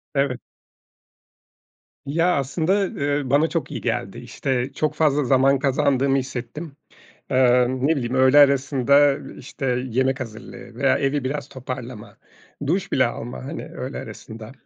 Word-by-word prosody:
Evet. 140 Hz, -2 st, 0 dB, 1.7 s
Ya, 165 Hz, +5 st, +1 dB
aslında, 175 Hz, +8 st, 0 dB
eee, 145 Hz, -3 st, -2 dB
bana 145 Hz, +4 st, +4 dB
çok 165 Hz, -6 st, -3 dB
iyi -, -, -5 dB
geldi, -, -, -2 dB
işte, 130 Hz, 0 st, -3 dB
çok 155 Hz, 0 st, -1 dB
fazla 150 Hz, -2 st, +2 dB
zaman 135 Hz, +1 st, +3 dB
kazandığımı 135 Hz, 0 st, +2 dB
hissettim. 135 Hz, +4 st, -5 dB, 0.6 s
Eee, 125 Hz, -1 st, +4 dB
ne 135 Hz, +5 st, +1 dB
bileyim 125 Hz, -1 st, -2 dB
öğle 130 Hz, +2 st, +6 dB
arasında, 140 Hz, 0 st, +4 dB, 0.2 s
işte, 135 Hz, +1 st, -7 dB, 0.2 s
yemek 130 Hz, +3 st, 0 dB
hazırlığı 110 Hz, -4 st, -9 dB
veya -, -, +2 dB
evi 140 Hz, 0 st, 0 dB
biraz 145 Hz, +1 st, -3 dB
toparlama, 125 Hz, -4 st, -8 dB, 0.5 s
duş 195 Hz, +4 st, -1 dB
bile 130 Hz, -, +3 dB
alma, 120 Hz, +2 st, -7 dB
hani, 155 Hz, -, -6 dB
öğle 145 Hz, -4 st, -7 dB
arasında 110 Hz, +1 st, -9 dB
135 Hz, 130 wpm, -22 LUFS, 130-145 Hz, 1.7 s, öğle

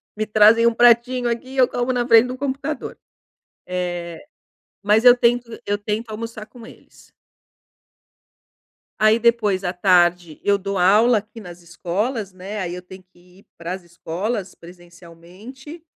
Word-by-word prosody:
Me 215 Hz, -, -2 dB
trazem 215 Hz, +2 st, +4 dB
um 235 Hz, -, +2 dB
pratinho 240 Hz, +1 st, +3 dB
aqui 235 Hz, +2 st, -4 dB
e 270 Hz, -, -10 dB
eu 255 Hz, -1 st, +5 dB
como 245 Hz, +1 st, -2 dB
na 245 Hz, -1 st, -1 dB
frente 230 Hz, 0 st, +6 dB
do 255 Hz, +1 st, -6 dB
computador. 280 Hz, +2 st, -5 dB, 0.7 s
Eh, 175 Hz, -, -5 dB, 0.6 s
mas 210 Hz, +3 st, +2 dB
eu 245 Hz, 0 st, +8 dB
tento 240 Hz, 0 st, +1 dB, 0.2 s
eu 205 Hz, -, 0 dB
tento 215 Hz, +2 st, -4 dB
almoçar 220 Hz, 0 st, -7 dB
com 235 Hz, -3 st, -14 dB
eles. -, -, -19 dB, 1.9 s
Aí 215 Hz, +1 st, +4 dB
depois, 220 Hz, -5 st, +1 dB
à 180 Hz, -, -2 dB
tarde, 175 Hz, -3 st, +2 dB
eu 200 Hz, 0 st, +2 dB
dou 195 Hz, 0 st, -4 dB
aula 215 Hz, +6 st, +4 dB
aqui 215 Hz, +2 st, -8 dB
nas 175 Hz, -3 st, -12 dB
escolas, 195 Hz, +6 st, -4 dB
né, 195 Hz, +3 st, -8 dB
aí 175 Hz, -2 st, -4 dB
eu 180 Hz, -, -8 dB
tenho 185 Hz, +1 st, -14 dB
que 180 Hz, 0 st, -24 dB
ir -, -, -23 dB
pras 175 Hz, +2 st, -6 dB
escolas 185 Hz, +4 st, -5 dB
presencialmente. 175 Hz, -, -14 dB
210 Hz, 150 wpm, -20 LUFS, 180-235 Hz, 1.9 s, eu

